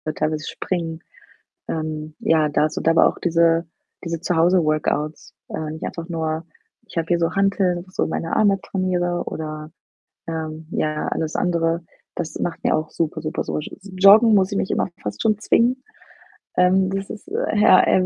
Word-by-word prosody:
teilweise 155 0 -2
springen. 165 -3 -3 0.7
Ähm, 155 -1 -4
ja, 155 -2 +3
da 150 +1 +2
so - - -4
da 165 - +4
aber 165 - +5
auch - - -5
diese 165 -1 +2 0.4
diese 165 -1 -3
Zuhause-Workouts, 160 -3 +1
äh, 155 -1 -4
nicht 160 - -7
einfach 165 0 -5
nur 160 -1 -2 0.4
ich - - -14
habe 165 0 -1
hier 175 - +2
so 165 -1 0
Hanteln, 195 -2 +2
wo 175 - -10
ich 185 - -19
so - - +1
meine 165 +1 -2
Arme 200 -2 +3
trainiere 180 -2 -1
oder, 155 -1 -5 0.6
ähm, 160 -1 -5
ja, 155 0 -1
alles 160 -1 -2
andere. 170 -2 +1 0.4
Das 160 - -4
macht 170 - -3
mir - - +3
auch 155 0 -3
super, 160 -1 -2
super 155 0 -2
so - - -2
sch - - -8
Joggen 200 +4 +6
muss 195 0 +3
ich 200 - 0
mich - - -1
immer - - +1 0.2
fast 105 - -4
schon 215 -2 +2
zwingen, 245 +4 +2 0.8
ähm, 185 +1 +4
das 195 0 -3
ist, 215 - -9
äh, 455 - -1
ja, 205 -3 +7
eher 185 - +3
170 Hz, 180 wpm, -22 LUFS, 155-190 Hz, 0.8 s, ja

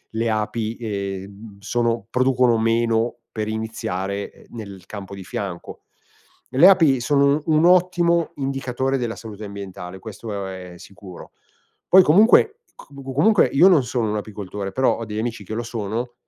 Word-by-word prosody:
le 115 +1 0
api, 110 +1 -2
ehm, 100 -1 -6
sono 115 0 -1
producono 125 -2 +2
meno 115 +1 +1
per 110 -1 -4
iniziare, 100 -3 -4
ehm, - - -20
nel 100 -5 -9
campo 100 -2 -8
di 95 - -9
fianco. 95 -1 -6 0.7
Le 140 +8 +7
api 160 -9 +4
sono 140 +3 +2
un 155 0 +3
ottimo 175 -2 +3
indicatore 135 -1 -2
della 120 -2 -3
salute 110 -2 -9
ambientale, 95 -2 -8
questo, 105 -1 -6
ehm, 95 -1 -8
è - - -13
sicuro. 95 0 -13 0.6
Poi 190 +1 +7
comunque 220 - +5 0.2
c - - -14 0.3
comunque 195 +9 +4
io 170 +7 +5
non 170 -8 +5
sono 120 -2 -2
un 105 - -1
apicoltore, 100 -1 -6
però 130 +6 +1
ho 115 - -5
degli 105 -1 -6
amici 115 -2 -4
che 105 - -7
lo 120 - -3
sono 115 +1 -4
115 Hz, 155 wpm, -22 LUFS, 100-135 Hz, 0.7 s, Le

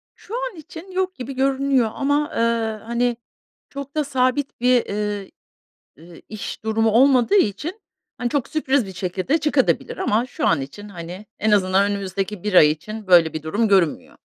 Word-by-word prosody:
Şu 420 - -13
an - - -6
için 325 +3 -11
yok 370 0 -1
gibi 255 +2 -6
görünüyor 270 -2 +2
ama, 290 +2 0
eee, - - -1 0.5
hani, 235 +1 0 0.5
çok 280 +1 -8
da 305 - +1
sabit 265 0 0
bir, 250 -1 +3
eee, 205 -1 -3 0.7
ııı, 170 0 -14
iş 215 0 -7
durumu 220 0 +1
olmadığı 255 - +4
için, 345 - 0 0.4
hani, 245 - -2
çok 280 -1 -1
sürpriz 280 -5 0
bir 190 - -9
şekilde 185 - -1
çıkabilir 295 -3 0
de. - - -4
Ama 235 - +1
şu 255 - -2
an - - +2
için, 205 +10 -9
hani, 180 +2 -8
en 215 - +1
azından 200 0 +3
önümüzdeki 195 0 -4
1 210 - -2
ay 150 -4 +7
için 215 +7 -7
böyle 170 -3 +5
bir 155 -1 -5
durum 210 +9 0
görünmüyor. 190 -6 +1
225 Hz, 170 wpm, -22 LUFS, 195-275 Hz, 0.7 s, ay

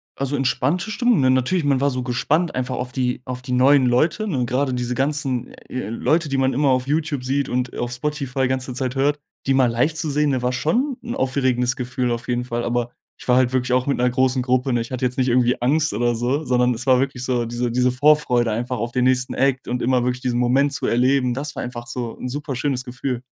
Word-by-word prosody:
also, 140 +1 -2
entspannte 145 - 0
Stimmung, 240 -3 +2
ne? 130 - +3
Natürlich, 130 +7 +1
man 140 -2 +1
war 140 - +3
so 130 -2 -3
gespannt 150 +7 0
einfach 130 0 -2
auf 125 0 -4
die 125 0 -1
auf 125 -1 -5
die 125 - -7
neuen 130 +2 +5
Leute, 155 - +1
ne? 135 -10 0
Grade 130 +2 0
diese 125 0 -2
ganzen, 135 -2 -1 0.2
äh, 130 -5 -4
Leute, 155 +7 0
die 135 - 0
man 135 0 +2
immer 140 +2 +2
auf 130 -1 +2
YouTube 150 -2 -1
sieht 135 +2 -1
und 125 0 -2
auf 120 0 -3
Spotify 135 0 -2
ganze 130 0 -2
Zeit 130 0 -3
hört, 145 +2 +1 0.3
die 135 - +3
mal 135 -1 +4
live 125 +7 +1
zu 160 -1 -2
sehen, 150 +1 +1
ne, 130 -2 0
war 125 +1 0
schon 240 - 0
'n 240 0 -4
aufregendes 130 -2 0
Gefühl 125 0 -2
auf 120 0 -4
jeden 125 0 -1
Fall. 120 -1 -3
Aber 120 0 -1 0.3
ich - - -12
war 125 0 +4
halt 130 -1 +2
wirklich 130 -1 0
auch 125 0 +2
mit 140 - +1
'ner 125 +1 +2
großen 130 +1 +1
Gruppe, 125 +1 +1
ne? 120 - +1
Ich 115 - -7
hatte 130 0 -2
jetzt 125 0 -2
nicht 130 -1 +1
irgendwie 125 0 +2
Angst 150 +4 +2
oder 120 +3 +1
so, 125 +6 -1
sondern 125 -1 +2
es 120 +1 -6
war 130 -2 +4
wirklich 135 -2 -2
so, 125 -2 0
diese 120 +1 -2
diese 125 +1 +2
Vorfreude 125 -4 +3
einfach 120 +3 -2
auf 115 +2 -3
den 125 0 0
nächsten 130 0 +1
Act 135 -1 0
und 125 +1 -2
immer 125 0 +2
wirklich 125 0 -1
diesen 125 -2 -1
Moment 130 +4 +2
zu - - -3
erleben, 125 +1 +2
das 145 +3 -5
war - - -4
einfach 120 -1 -7
so 120 -1 -5
'n 125 - -4
superschönes 135 -1 -2
Gefühl. 125 0 -4
130 Hz, 240 wpm, -21 LUFS, 125-140 Hz, 0.3 s, neuen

